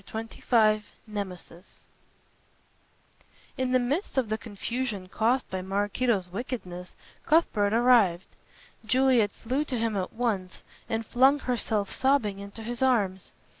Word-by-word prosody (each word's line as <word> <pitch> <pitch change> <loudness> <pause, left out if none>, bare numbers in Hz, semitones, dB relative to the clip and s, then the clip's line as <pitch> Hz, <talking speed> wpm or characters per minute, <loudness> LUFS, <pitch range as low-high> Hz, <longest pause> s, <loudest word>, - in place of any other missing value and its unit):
CHAPTER 225 +3 -7
XXV 215 -3 +4 0.2
NEMESIS 195 -4 -8 1.7
In 260 -1 -1
the 255 - +5
midst 275 +8 -2
of 250 -5 +1
the 215 - 0
confusion 220 -1 -4
caused 235 +7 +1
by 185 0 -2
Maraquito's 200 0 0
wickedness 185 -5 -6 0.3
Cuthbert 220 -11 +3
arrived. 225 -7 +4 0.6
Juliet 245 -1 +3
flew 255 +8 -2
to 260 -4 -2
him 225 -1 -1
at 185 -2 -3
once 215 -6 -2 0.3
and 225 0 -2
flung 265 +5 +4
herself 225 -6 -1
sobbing 260 -7 +1
into 200 +3 -8
his 240 +3 -5
arms. 205 -8 +1
225 Hz, 125 wpm, -27 LUFS, 200-250 Hz, 1.7 s, the